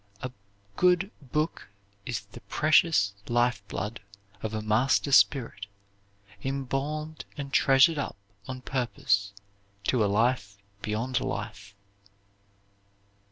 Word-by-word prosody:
A 130 - -3 0.5
good 180 +2 +3
Booke 150 +1 -2 0.4
is 120 -3 -2
the 100 0 -14
pretious 145 -1 +3 0.2
life 120 -2 +2
blood 105 +3 -4 0.4
of 110 - -3
a 110 - -2
master 120 +6 +2
spirit, 120 -7 +3 0.8
imbalm'd 140 +4 -3
and 140 -1 -6
treasur'd 145 +3 +5
up 140 - -4 0.3
on 130 0 -6
purpose 110 -6 0 0.5
to 115 +2 +2
a - - +3
Life 105 -1 +1 0.2
beyond 115 +4 -1
Life." 100 0 -5
125 Hz, 105 wpm, -28 LUFS, 105-140 Hz, 0.8 s, treasur'd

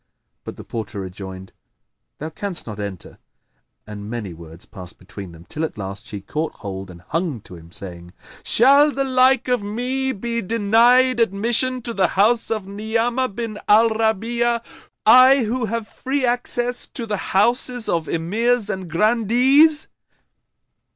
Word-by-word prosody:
But - - -8
the - - -10
porter 110 -2 -6
rejoined, 95 0 -9 0.6
"Thou 155 +2 -6
canst 195 +2 -4
not 105 -2 -8
enter;" 100 -4 -7 0.7
and 105 -1 -8
many 110 -6 -5
words 80 +1 -11
passed 90 -5 -10
between 95 0 -10
them, 85 +1 -15
till 155 - -4
at 160 - -4
last 100 0 -7
she 100 -2 -7
caught 155 +10 -3
hold 95 -2 -7
and 85 -1 -12
hung 165 -6 -2
to - - -13
him 85 0 -14
saying, 90 -2 -7 0.3
"Shall 280 +5 +5
the 275 -1 -1
like 260 -1 +3
of 250 -3 +1
me 250 +6 -2
be 235 +1 -3
denied 230 +5 +3
admission 235 +4 +1
to 235 - -4
the 190 -4 +2
house 225 +4 +3
of 215 -4 -2
Ni'amah 225 +5 -1
bin 215 0 -5
al 220 +2 +5
Rabi'a, 230 +2 0 0.4
I 255 +3 +7
who 235 +2 -1
have 225 0 -3
free 265 +2 -2
access 245 0 0
to 235 - -7
the 210 -2 -2 0.2
houses 240 +2 +2
of 165 -2 -1
Emirs 215 +7 0
and 185 -2 -6
Grandees?" 240 - +3
215 Hz, 150 wpm, -21 LUFS, -, 0.7 s, I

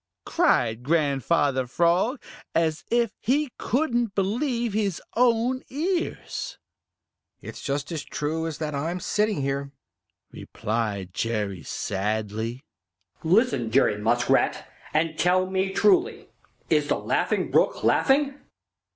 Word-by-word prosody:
cried 120 - +2
Grandfather 140 -2 +1
Frog, 175 - +2 0.4
as 160 -1 +1
if 235 -3 +2
he 275 +4 +1
couldn't 240 -6 0
believe 235 +3 0
his 200 -4 0 0.2
own 245 +1 +2
ears. 340 +6 -3 0.8
"It's - - -9
just 145 +3 -3
as 160 -3 -3
true 160 +3 -3
as 160 - -5
that 155 -2 -3
I'm 165 +6 -2
sitting 210 -5 0
here," 140 0 -2 0.6
replied 105 -4 -3
Jerry 105 -6 -2
sadly. 110 - -3 0.6
"Listen, 180 - +2
Jerry 110 -3 +3
Muskrat, 120 +3 +1 0.2
and 155 +1 0
tell 185 +1 +3
me 190 +1 0
truly; 405 - +2 0.4
is - - +2
the - - +1
Laughing - - 0
Brook - - +2
laughing?" 280 +1 +3
170 Hz, 110 wpm, -25 LUFS, -, 0.8 s, Jerry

